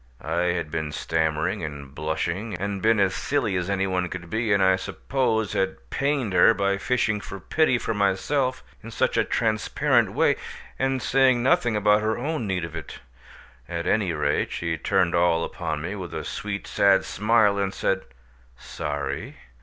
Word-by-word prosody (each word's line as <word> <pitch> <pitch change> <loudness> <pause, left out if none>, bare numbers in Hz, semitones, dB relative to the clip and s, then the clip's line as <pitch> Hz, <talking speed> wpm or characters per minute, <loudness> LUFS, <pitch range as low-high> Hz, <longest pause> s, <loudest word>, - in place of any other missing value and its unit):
I 85 +1 0
had 80 -3 -4
been 80 -2 -2
stammering 80 +5 -1
and 70 -3 -7
blushing, 85 +8 -3
and 100 +2 -3
been 110 -1 +3
as 95 -2 +3
silly 125 -9 -1
as 90 +1 -1
any 95 -1 +1
one 90 -2 -1
could 85 -1 -7
be, 110 0 0
and 100 -1 +4
I 95 0 +5
suppose 110 +1 -1
had 95 0 0
pained 140 -7 0
her 115 - +6
by 100 -1 0
fishing 110 -3 0
for 95 0 -8
pity 155 - +2
for 115 - -2
myself 125 +7 0 0.2
in 115 - -9
such 115 - 0
a - - +3
transparent 110 -3 +1
way, - - +3 0.4
and 135 -1 0
saying 130 -2 +3
nothing 130 -5 +2
about 105 0 +3
her 110 +1 0
own 140 -2 -2
need 90 -3 -1
of 85 0 -9
it; 80 - -7 0.7
at 85 0 -3
any 95 -1 +1
rate, 75 -2 0
she 85 -1 -2
turned 95 0 +1
all 85 -1 +3
upon 80 -3 -4
me 95 - -3
with 95 -4 -6
a - - -3
sweet 105 -1 -4
sad 100 -1 +3
smile 105 -2 +2
and 100 -1 0
said, 95 0 0 0.6
"Sorry? - - -5
100 Hz, 175 wpm, -25 LUFS, 85-115 Hz, 0.7 s, her